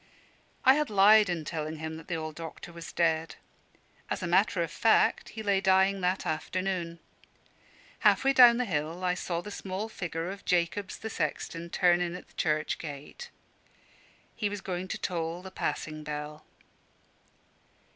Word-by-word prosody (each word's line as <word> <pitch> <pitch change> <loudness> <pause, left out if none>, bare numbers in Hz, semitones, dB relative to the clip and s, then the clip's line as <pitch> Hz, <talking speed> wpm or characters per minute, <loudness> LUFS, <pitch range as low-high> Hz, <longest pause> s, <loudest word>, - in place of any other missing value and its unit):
I 260 - +9
had 300 +1 0
lied 210 0 +6
in 165 -3 -2
telling 155 0 -4
him 160 0 -5
that 160 - -12
the 175 - -2
old 155 -1 -4
doctor 165 +2 -9
was 170 0 -8
dead. 165 -1 0 0.7
As - - -3
a - - -1
matter - - +3
of - - -5
fact - - +3
he 220 - -7
lay 200 -2 +2
dying 190 +1 +3
that 180 +1 0
afternoon. 170 +2 -2 1.0
Half - - +4
way 270 0 +4
down 245 -3 +8
the 250 - 0
hill 165 -1 -3
I 180 -1 +2
saw 175 -1 -3
the 210 - -8
small 200 +2 -4
figure 175 -3 -4
of 195 0 -9
Jacobs, 180 +3 0
the 220 - -6
sexton, 170 -3 -3
turn 175 0 +3
in 175 0 -2
at 180 - -10
the - - -23
church 155 -1 0
gate. 150 - -8 1.1
He 210 - -1
was 205 -1 -5
going 185 -1 -4
to - - -3
toll 170 0 -3
the 190 - -9
passing 155 -4 -3
bell. 150 0 -6
175 Hz, 165 wpm, -29 LUFS, 160-195 Hz, 1.1 s, I